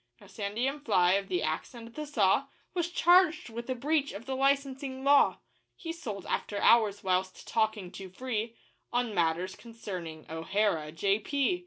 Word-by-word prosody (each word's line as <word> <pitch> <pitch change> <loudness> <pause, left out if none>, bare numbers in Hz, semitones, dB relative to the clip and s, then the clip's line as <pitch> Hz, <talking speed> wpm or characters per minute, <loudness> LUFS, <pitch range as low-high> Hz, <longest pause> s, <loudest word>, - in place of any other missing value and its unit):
Now - - -16
Sandy 210 +4 -2
M'Fly, 230 -11 +2
of 195 - -9
the 360 - -1
Axe - - -3
and 230 0 -10
the 305 +2 -5
Saw, 240 -1 +2 0.3
Was 345 -1 -1
charged 350 -6 +4
with 235 +2 -7
a 255 - 0
breach 285 +3 0
of 205 +4 -8
the 265 - -3
licensing 270 -1 0
law 280 +1 +5 0.4
He 330 -2 -6
sold 215 - -6
after 205 - -2
hours 215 -3 +4
whilst 185 0 -1
talking 215 -5 0
too 190 -1 -8
free 230 +2 -3 0.4
On 245 -2 0
matters 175 +1 0
concerning 185 -9 -8
O'Hara, 160 -1 0
J.P. 215 - +1
230 Hz, 160 wpm, -30 LUFS, 195-275 Hz, 0.4 s, law